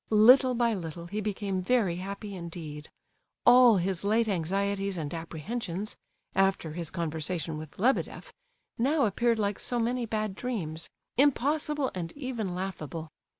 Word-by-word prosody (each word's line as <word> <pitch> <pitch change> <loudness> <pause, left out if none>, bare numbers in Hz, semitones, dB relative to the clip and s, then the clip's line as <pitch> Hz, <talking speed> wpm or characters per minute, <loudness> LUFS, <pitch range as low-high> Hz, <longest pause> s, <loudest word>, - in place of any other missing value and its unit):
Little 250 +4 +7
by 235 -1 +2
little 170 -3 -5
he 205 +5 -3
became 200 -2 -2
very 190 -4 +2
happy 200 +2 -6
indeed. 165 -4 -7 0.6
All 245 -3 +8
his 185 0 0
late 220 +3 +2
anxieties 195 +1 -1
and 150 -3 -4
apprehensions 175 +4 -4 0.4
(after 195 -5 +1
his 170 -1 -3
conversation 160 -1 -3
with 155 -1 -10
Lebedeff) 265 - 0 0.5
now 280 +4 +3
appeared 230 +3 +2
like 205 -2 -1
so 245 - -2
many 240 +1 0
bad 215 -2 -1
dreams—impossible, 255 - -1
and 170 -3 -4
even 240 -10 -3
laughable. 165 -4 -5
200 Hz, 130 wpm, -29 LUFS, 170-235 Hz, 0.6 s, All